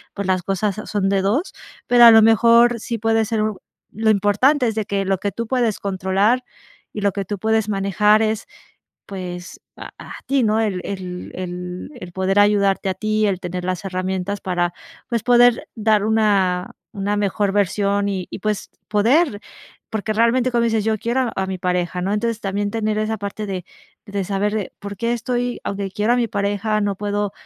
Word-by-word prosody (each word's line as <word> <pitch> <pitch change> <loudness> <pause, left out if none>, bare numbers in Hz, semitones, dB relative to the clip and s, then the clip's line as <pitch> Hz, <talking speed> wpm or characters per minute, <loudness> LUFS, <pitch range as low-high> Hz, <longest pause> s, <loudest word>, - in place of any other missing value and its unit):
pues, 200 -1 -3
las 185 -1 +1
cosas 195 +2 -1
son 200 -2 0
de 195 -1 +2
2, 225 - 0 0.3
pero, 240 -1 +7
a 230 - +11
lo 225 0 +8
mejor 235 +2 +5
sí 230 +1 -4
puede 225 0 +1
ser. 220 0 -1 0.5
Lo 220 +1 0
importante 215 +8 +3
es 220 - -2
de 220 -1 -1
que 200 -1 -1
lo 190 -1 0
que 205 - -2
tú 230 +4 -4
puedes 240 -4 0
controlar, 195 +5 +1 0.5
y 210 - -5
lo 200 0 +2
que 200 -1 -3
tú 205 +2 -4
puedes 220 +1 +1
manejar 210 +2 +3
es, 220 0 -1 0.6
pues, 180 -2 -7 0.2
a - - -9
a - - -10
ti, 270 0 +2
¿no? 215 0 +2
El 205 -5 -1
el 185 -2 -6
el 180 +2 -6
el 175 -3 -9
poder 190 +2 0
ayudarte 200 -2 +2
a - - -2
ti, 215 +1 0
el 190 -3 -1
tener 180 0 -4
las 185 0 -3
herramientas, 190 +1 -3
para 175 -2 -1 0.4
pues, 235 -3 0
poder 245 -1 +4
dar 215 -2 +2
una 200 -5 +2 0.2
una 205 +1 -2
mejor 200 0 0
versión, 200 0 +1
y 190 -3 -3
y - - -6
pues, 210 0 -2 0.2
poder, 225 +4 +2 0.5
porque, 220 0 -2
realmente 235 +3 +2
como 235 -1 +2
dices 225 -2 +1
yo 220 0 0
quiero 240 +3 0
a 190 - -1
mi 190 -1 -4
pareja, 180 0 -1
¿no? 195 +3 -1
Entonces 230 +1 -1
también 205 0 -2
tener 215 -1 -1
esa 215 +1 -1
parte 205 +1 -5
de 185 -3 -4 0.4
de 200 -2 -3
saber, 205 +1 -2
por 200 0 -7
qué, 230 +4 -1
estoy 245 +1 -2
aunque 200 -1 -3
quiero 210 +4 +1
a - - +1
mi 240 -2 +1
pareja, 205 0 -1
no 200 -1 -1
puedo 205 0 -2
205 Hz, 190 wpm, -21 LUFS, 195-225 Hz, 0.6 s, a